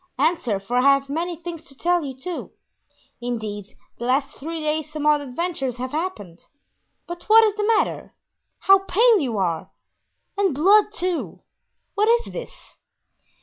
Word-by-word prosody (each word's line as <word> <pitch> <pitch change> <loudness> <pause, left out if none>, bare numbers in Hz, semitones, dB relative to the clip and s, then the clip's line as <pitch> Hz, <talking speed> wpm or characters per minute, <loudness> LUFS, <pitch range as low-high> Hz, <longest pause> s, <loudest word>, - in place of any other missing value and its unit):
Answer, 275 - +1
for 235 +6 -3
I - - +4
have 275 0 +3
many 340 +3 -2
things 335 -1 -8
to 275 - -12
tell 350 +3 +1
you, 270 -2 -6
too; 350 +5 -6 0.7
indeed, 215 -4 -5 0.2
the 240 - -4
last 270 +3 0
three 325 +3 -5
days 305 0 -2
some 305 -1 -4
odd 300 -1 +4
adventures 275 -2 -3
have 255 +1 -5
happened—but 315 - -8
what 450 +1 +8
is 430 -2 +2
the 425 +2 0
matter? - - -2 0.5
how 390 0 +6
pale 440 +3 +4
you 245 -8 -2
are! 170 -4 -1 0.7
and 385 -8 +2
blood, 405 +8 +5
too! 360 -4 -3 0.5
What 420 +2 +2
is 470 +1 +1
this?" - - -10
310 Hz, 150 wpm, -23 LUFS, 260-365 Hz, 0.7 s, what